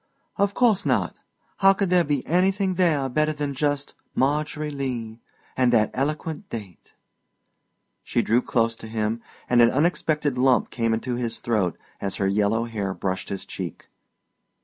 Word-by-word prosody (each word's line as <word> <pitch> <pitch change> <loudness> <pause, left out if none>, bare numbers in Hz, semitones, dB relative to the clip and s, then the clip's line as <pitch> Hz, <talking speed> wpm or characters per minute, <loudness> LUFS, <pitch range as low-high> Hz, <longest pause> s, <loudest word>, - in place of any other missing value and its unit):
"Of 200 0 +1
course 230 -6 +3
not. - - +1 0.4
How 195 0 +6
could 195 -2 -1
there 180 -1 +5
be 145 -4 -1
anything 190 +3 +2
there 165 -7 +2
better 155 +4 +1
than 145 -1 -3
just 145 0 -1 0.2
'Margery 150 +2 0
Lee,' 120 -5 -4 0.4
and 125 -1 +3
that 110 -3 +3
eloquent 150 +3 -3
date?" 100 -7 -9 1.1
She - - 0
drew 120 +3 +3
close 115 -2 +1
to - - -9
him 110 +1 -2 0.3
and 120 -1 +4
an 115 - +7
unexpected 150 -2 +1
lump 130 -1 +3
came 115 -2 +1
into 120 +2 -3
his 115 -2 -3
throat 105 -7 0 0.2
as 100 - -2
her 100 - 0
yellow 105 +3 +2
hair 100 -4 -3
brushed 95 0 -3
his 95 - -4
cheek. - - -7
130 Hz, 155 wpm, -24 LUFS, 115-155 Hz, 1.1 s, an